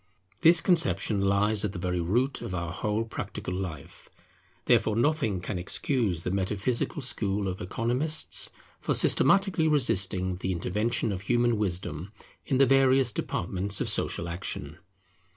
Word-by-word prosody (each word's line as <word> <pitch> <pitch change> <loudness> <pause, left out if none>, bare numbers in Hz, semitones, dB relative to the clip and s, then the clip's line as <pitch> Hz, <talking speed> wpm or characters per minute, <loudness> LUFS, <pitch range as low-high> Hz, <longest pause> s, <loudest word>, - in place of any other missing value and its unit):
This 165 +1 +7
conception 105 - +3
lies 100 +2 +2
at 105 -2 -2
the - - -6
very 90 0 -2
root 120 +11 0
of 90 - -5
our 85 -2 -4
whole 105 +5 -2
practical 110 -4 -6
life; 90 -7 -7 0.6
therefore 110 - +3
nothing 120 - +1
can 90 0 -4
excuse 95 - -1
the 90 - -2
metaphysical 105 - -2
school 105 -5 -1
of 95 0 -5
Economists 120 - 0 0.3
for - - -1
systematically 185 +1 +3
resisting 95 - +2
the 95 0 -2
intervention 105 +6 -1
of 95 -2 -4
human 120 +3 +1
wisdom 90 -3 -3 0.4
in 130 - +1
the 135 - +5
various 135 -1 +3
departments 95 0 -3
of - - -1
social 85 - -1
action. 85 +2 -6
105 Hz, 140 wpm, -27 LUFS, 90-125 Hz, 0.6 s, This